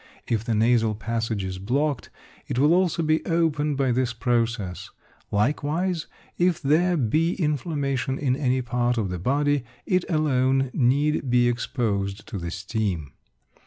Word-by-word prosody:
If 110 Hz, -2 st, 0 dB
the 115 Hz, -1 st, -1 dB
nasal 115 Hz, 0 st, +3 dB
passage 115 Hz, -1 st, -2 dB
is 95 Hz, 0 st, -4 dB
blocked, 135 Hz, +5 st, -1 dB, 0.4 s
it -, -, -3 dB
will 145 Hz, +5 st, +4 dB
also 175 Hz, -2 st, +2 dB
be 155 Hz, 0 st, +1 dB
opened 150 Hz, -3 st, +1 dB
by 135 Hz, -2 st, +2 dB
this 125 Hz, -1 st, 0 dB
process. 115 Hz, -6 st, -1 dB, 0.4 s
Likewise, 150 Hz, -, 0 dB, 0.3 s
if 175 Hz, -1 st, +2 dB
there 170 Hz, +4 st, +2 dB
be 155 Hz, +7 st, +1 dB
inflamation 140 Hz, -4 st, -1 dB
in 130 Hz, -3 st, +1 dB
any 130 Hz, -2 st, 0 dB
part 120 Hz, 0 st, 0 dB
of 105 Hz, -4 st, 0 dB
the 90 Hz, -1 st, -4 dB
body, 145 Hz, -, +1 dB, 0.2 s
it 185 Hz, -1 st, +1 dB
alone 135 Hz, -4 st, +2 dB
need 140 Hz, +2 st, +1 dB
be 120 Hz, 0 st, +4 dB
exposed 105 Hz, -5 st, -2 dB
to 100 Hz, -, -4 dB
the 85 Hz, 0 st, -4 dB
steam. 95 Hz, -, -3 dB
130 Hz, 145 wpm, -25 LUFS, 115-150 Hz, 0.4 s, will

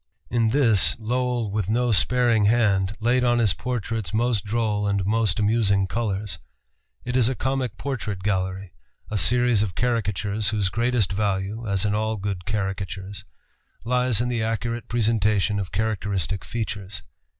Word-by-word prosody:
In 115 Hz, -1 st, +2 dB
this 115 Hz, -6 st, +5 dB
Lowell 120 Hz, -1 st, -1 dB
with 105 Hz, -2 st, -2 dB
no 120 Hz, +2 st, +1 dB
sparing 115 Hz, +4 st, +3 dB
hand 105 Hz, -3 st, +2 dB
laid 125 Hz, +2 st, +2 dB
on 120 Hz, -1 st, +3 dB
his 110 Hz, -5 st, +3 dB
portraits 115 Hz, -4 st, -3 dB
most 115 Hz, -2 st, +1 dB
droll 105 Hz, -1 st, -1 dB
and 100 Hz, 0 st, +1 dB, 0.4 s
amusing 105 Hz, -2 st, +2 dB
colors. 100 Hz, -4 st, -3 dB, 0.7 s
It 125 Hz, -, -3 dB
is 125 Hz, -2 st, +4 dB
a 130 Hz, -, -2 dB
comic 130 Hz, -1 st, -2 dB
portrait 110 Hz, -8 st, -4 dB
gallery, 95 Hz, -2 st, -2 dB, 0.4 s
a 105 Hz, -, 0 dB
series 120 Hz, -2 st, +3 dB
of 100 Hz, -5 st, -2 dB
caricatures 110 Hz, -3 st, -1 dB
whose 105 Hz, -3 st, 0 dB
greatest 115 Hz, -1 st, 0 dB
value 100 Hz, +2 st, -2 dB
(as 100 Hz, -1 st, 0 dB
in 105 Hz, -, +1 dB
all 110 Hz, +1 st, -1 dB
good 95 Hz, -3 st, -4 dB
caricatures) 95 Hz, -1 st, -4 dB, 0.6 s
lies 125 Hz, -1 st, +1 dB
in 120 Hz, -, 0 dB
the 120 Hz, -2 st, -1 dB
accurate 115 Hz, +1 st, -2 dB
presentation 105 Hz, -3 st, +1 dB
of 95 Hz, -2 st, -4 dB
characteristic 100 Hz, -3 st, -2 dB
features. 100 Hz, -, -5 dB
110 Hz, 145 wpm, -24 LUFS, 100-120 Hz, 0.7 s, this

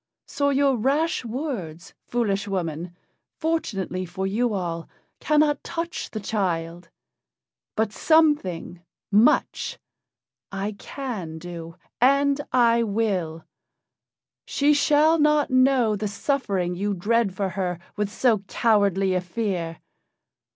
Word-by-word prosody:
"So 285 Hz, 0 st, 0 dB
your 275 Hz, -2 st, +3 dB
rash 285 Hz, +8 st, +1 dB
words, 230 Hz, -, -5 dB
foolish 205 Hz, -4 st, 0 dB
woman, 175 Hz, -2 st, -3 dB, 0.4 s
fortunately 205 Hz, -, -2 dB
for 185 Hz, +2 st, -4 dB
you 225 Hz, +5 st, 0 dB
all, 170 Hz, -4 st, -3 dB, 0.3 s
cannot 300 Hz, -1 st, +2 dB
touch 335 Hz, +1 st, -4 dB
the 215 Hz, -, -5 dB
child. 175 Hz, -5 st, -2 dB, 0.9 s
But 220 Hz, -1 st, 0 dB
something 295 Hz, -, +2 dB, 0.3 s
much 215 Hz, +4 st, +3 dB, 0.7 s
I 195 Hz, +1 st, -3 dB
can 205 Hz, -, -6 dB
do, 165 Hz, 0 st, -8 dB, 0.3 s
and 280 Hz, +2 st, +4 dB
I 235 Hz, -2 st, +4 dB
will. 195 Hz, -7 st, -1 dB, 1.0 s
She 290 Hz, +1 st, +3 dB
shall 300 Hz, +2 st, +4 dB
not 300 Hz, -1 st, +3 dB
know 255 Hz, -4 st, +4 dB
the 210 Hz, +1 st, -2 dB
suffering 200 Hz, -5 st, -1 dB
you 200 Hz, +3 st, -2 dB
dread 210 Hz, +1 st, +1 dB
for 195 Hz, 0 st, -1 dB
her 180 Hz, -1 st, -2 dB, 0.2 s
with 210 Hz, -1 st, -1 dB
so 230 Hz, -2 st, +2 dB
cowardly 200 Hz, -4 st, +2 dB
a 180 Hz, -, +1 dB
fear. 180 Hz, -4 st, -3 dB
210 Hz, 110 wpm, -24 LUFS, 180-270 Hz, 1.0 s, and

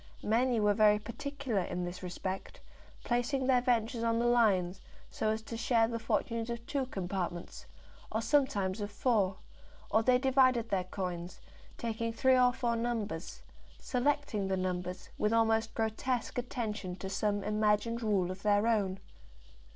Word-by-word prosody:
Many 235 Hz, +2 st, +2 dB
were 210 Hz, -1 st, +3 dB
very 210 Hz, 0 st, +5 dB
particular 250 Hz, +1 st, -3 dB
in 180 Hz, 0 st, -3 dB
this 175 Hz, +1 st, -6 dB
respect, 185 Hz, +1 st, -5 dB, 0.4 s
placing 245 Hz, +2 st, 0 dB
their 255 Hz, -1 st, +4 dB
ventures 240 Hz, -1 st, +1 dB
on 230 Hz, 0 st, +1 dB
the 235 Hz, -, +1 dB
lines, 195 Hz, -7 st, +3 dB, 0.3 s
so 215 Hz, -, -1 dB
as 220 Hz, 0 st, -1 dB
to 230 Hz, -, -6 dB
share 230 Hz, -1 st, +2 dB
the 230 Hz, 0 st, -3 dB
fortunes 230 Hz, +1 st, -1 dB
of 235 Hz, 0 st, -5 dB
two 270 Hz, -1 st, -2 dB
compartments, 180 Hz, -4 st, -4 dB, 0.4 s
or 220 Hz, -, 0 dB
sometimes 225 Hz, -7 st, +1 dB
of 205 Hz, -, -3 dB
four; 205 Hz, -3 st, +1 dB, 0.5 s
or 220 Hz, -, +4 dB
they 250 Hz, +2 st, +4 dB
divided 255 Hz, -3 st, +3 dB
their 185 Hz, -2 st, 0 dB
coins, 180 Hz, -2 st, -5 dB, 0.4 s
taking 230 Hz, 0 st, -2 dB
three 260 Hz, +3 st, +3 dB
or 250 Hz, -1 st, +5 dB
four 240 Hz, -2 st, -1 dB
numbers, 225 Hz, -8 st, -3 dB, 0.3 s
selecting 255 Hz, -6 st, 0 dB
the 190 Hz, 0 st, 0 dB
numbers 180 Hz, 0 st, -3 dB
with 210 Hz, +1 st, +2 dB
almost 225 Hz, 0 st, +2 dB
grotesque 230 Hz, +3 st, -1 dB
attention 215 Hz, -7 st, -4 dB
to 190 Hz, +1 st, -6 dB
some 205 Hz, +1 st, -1 dB
imagined 215 Hz, +2 st, +1 dB
rule 200 Hz, -5 st, +1 dB
of 185 Hz, +1 st, -8 dB
their 205 Hz, 0 st, +3 dB
own. 205 Hz, -5 st, +1 dB
220 Hz, 150 wpm, -32 LUFS, 195-240 Hz, 0.5 s, very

